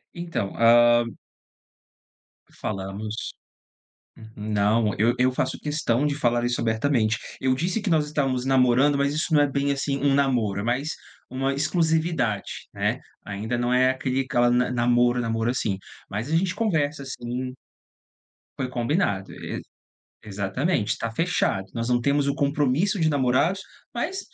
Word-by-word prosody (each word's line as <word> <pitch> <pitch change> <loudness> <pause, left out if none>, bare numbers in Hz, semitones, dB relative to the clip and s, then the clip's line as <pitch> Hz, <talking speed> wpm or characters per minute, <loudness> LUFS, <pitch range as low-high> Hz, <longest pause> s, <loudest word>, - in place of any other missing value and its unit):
Então, 170 - -3
hã 120 0 +5 1.5
Falamos. 105 +2 -4 0.8
Uhum. 110 -1 -12
Não, 105 +1 +1
eu 115 +4 +3
eu 130 +1 +4
faço 130 +1 -2
questão 145 -3 0
de 145 -1 0
falar 120 -3 +1
isso 120 -1 -1
abertamente. 110 -1 +1 0.2
Eu 130 -1 +2
disse 175 - -1
que 205 - -2
nós 155 -3 +3
estávamos 135 -4 -1
namorando, 135 +2 +4
mas 140 0 +1
isso 155 +2 -1
não 150 - +6
é 145 - +4
bem 140 +1 0
assim 140 0 -1
um 140 -1 +2
namoro, 120 -8 +1
é - - -5
mais 130 +7 -1 0.3
uma 135 +1 -1
exclusividade, 160 - 0
né. - - -1 0.3
Ainda 105 +4 -3
não 120 +1 0
é 130 +1 +4
aquele 130 0 -1
aquela 120 -2 +2
namoro 120 0 +2
namoro 115 0 0
assim, 110 -6 -1 0.3
mas 105 +7 -4
a - - +3
gente 180 +2 +1
conversa, 155 -9 0
sim. 125 0 -5 1.0
Foi 130 - -2
combinado. 120 - -1
E - - -6 0.6
exatamente, 105 - -1
tá 115 - -3
fechado, 140 - 0
nós 115 0 -3
não 120 -1 +2
temos 140 +3 +1
o 140 - +1
compromisso 145 +8 +1
de 160 - +3
namorados, 145 +7 +2 0.3
mas 355 +11 -2
130 Hz, 145 wpm, -25 LUFS, 115-145 Hz, 1.5 s, não